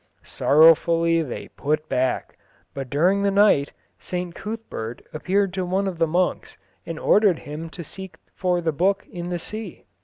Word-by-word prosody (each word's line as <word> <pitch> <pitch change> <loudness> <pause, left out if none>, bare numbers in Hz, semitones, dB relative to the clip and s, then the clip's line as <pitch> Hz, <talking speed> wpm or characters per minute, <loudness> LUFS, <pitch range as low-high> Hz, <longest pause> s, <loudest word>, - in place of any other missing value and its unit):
Sorrowfully 165 +2 +4
they 140 -7 -6
put 155 +2 -2
back, 130 -2 -1 0.4
but 135 -2 -6
during 180 +8 +2
the 200 - +2
night 195 -8 +4 0.3
St 180 -1 -4
Cuthbert 200 - -6
appeared 190 +4 0
to 190 -1 -2
one 190 +2 0
of 180 -3 -4
the 165 - +3
monks 175 +3 -1 0.3
and 165 - -4
ordered 200 0 +4
him 155 +3 -7
to 170 +2 -8
seek 190 +4 -9 0.2
for 180 -1 0
the 165 -1 0
book 190 +6 +1
in 175 0 -5
the 175 - -1
sea. 215 +6 -8
175 Hz, 160 wpm, -23 LUFS, 155-190 Hz, 0.4 s, Sorrowfully